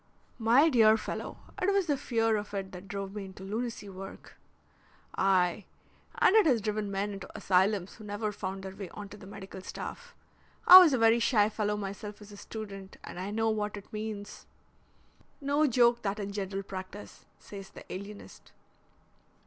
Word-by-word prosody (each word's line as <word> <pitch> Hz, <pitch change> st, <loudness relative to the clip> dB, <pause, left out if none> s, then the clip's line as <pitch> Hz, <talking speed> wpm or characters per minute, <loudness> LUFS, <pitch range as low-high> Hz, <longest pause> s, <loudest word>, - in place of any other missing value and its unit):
"My 240 Hz, +7 st, +5 dB
dear 225 Hz, -7 st, +6 dB
fellow, -, -, -5 dB, 0.2 s
it 375 Hz, +2 st, +3 dB
was 395 Hz, -2 st, +2 dB
the 295 Hz, -4 st, +1 dB
fear 225 Hz, -4 st, +1 dB
of 205 Hz, -1 st, -4 dB
it 195 Hz, -1 st, -4 dB
that 180 Hz, +1 st, -10 dB
drove 195 Hz, 0 st, -5 dB
me 205 Hz, -2 st, -5 dB
into 190 Hz, 0 st, -11 dB
lunacy 220 Hz, +1 st, -4 dB
work." 195 Hz, 0 st, -10 dB, 0.8 s
"Aye, 185 Hz, 0 st, +2 dB, 0.5 s
and 385 Hz, -, +4 dB
it 435 Hz, -6 st, +6 dB
has 250 Hz, -6 st, +4 dB
driven 210 Hz, -1 st, -2 dB
men 200 Hz, +1 st, -2 dB
into 195 Hz, -1 st, -8 dB
asylums 190 Hz, 0 st, +2 dB
who 220 Hz, -, -12 dB
never 210 Hz, +1 st, -3 dB
found 195 Hz, -1 st, -5 dB
their 190 Hz, 0 st, -7 dB
way 195 Hz, -3 st, -7 dB
on 205 Hz, -1 st, -7 dB
to 205 Hz, -, -11 dB
the 190 Hz, -, -12 dB
medical 195 Hz, -1 st, -9 dB
staff. 485 Hz, -, -8 dB, 0.5 s
I 365 Hz, +1 st, +13 dB
was 345 Hz, -6 st, +6 dB
a -, -, +3 dB
very 225 Hz, 0 st, +5 dB
shy 215 Hz, -3 st, +3 dB
fellow 210 Hz, -1 st, -1 dB
myself 205 Hz, +1 st, -6 dB
as 210 Hz, 0 st, -13 dB
a 205 Hz, -, -11 dB
student, 200 Hz, -3 st, -8 dB
and -, -, -8 dB
I 190 Hz, +2 st, -4 dB
know 225 Hz, +1 st, +1 dB
what 210 Hz, -1 st, -2 dB
it 200 Hz, -, -12 dB
means." 210 Hz, -1 st, -6 dB, 0.9 s
"No 285 Hz, +2 st, +2 dB
joke 240 Hz, -1 st, +4 dB
that 200 Hz, 0 st, -2 dB
in 200 Hz, -1 st, -4 dB
general 195 Hz, -1 st, -3 dB
practice," 190 Hz, +1 st, -9 dB
says 195 Hz, -1 st, -10 dB
the -, -, -12 dB
alienist. 200 Hz, +2 st, -10 dB
205 Hz, 180 wpm, -30 LUFS, 195-225 Hz, 0.9 s, I